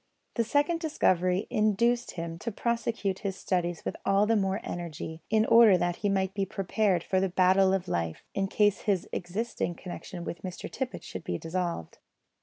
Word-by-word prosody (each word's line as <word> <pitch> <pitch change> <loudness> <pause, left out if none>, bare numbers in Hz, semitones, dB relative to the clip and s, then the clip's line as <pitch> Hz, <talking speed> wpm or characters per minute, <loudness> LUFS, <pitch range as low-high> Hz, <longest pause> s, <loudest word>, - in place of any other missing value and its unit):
This 230 -2 -1
second 290 +4 +2
discovery 185 - +1
induced 235 +3 +2
him 165 -1 -5
to 230 - -3
prosecute 225 -3 -1
his 195 -2 -3
studies 175 -3 -2
with - - -2
all 195 +1 +3
the 225 +1 +3
more 195 -1 +1
energy, 160 -1 -6
in 220 0 +3
order 230 -5 +7
that 175 0 -1
he 205 - 0
might 190 -1 0
be 200 -1 0
prepared 195 -1 0
for 190 - +1
the 190 0 +1
battle 190 +1 +4
of 190 -1 0
life, 85 - -2
in 195 0 0
case 205 0 +2
his 190 -3 +1
existing 185 0 -3
connection 175 0 -7
with 170 -1 -6
Mr 180 -1 -6
Tippet 260 -1 -4
should 95 - -7
be 85 - -2
dissolved. 170 - -3
190 Hz, 180 wpm, -29 LUFS, 175-215 Hz, -, order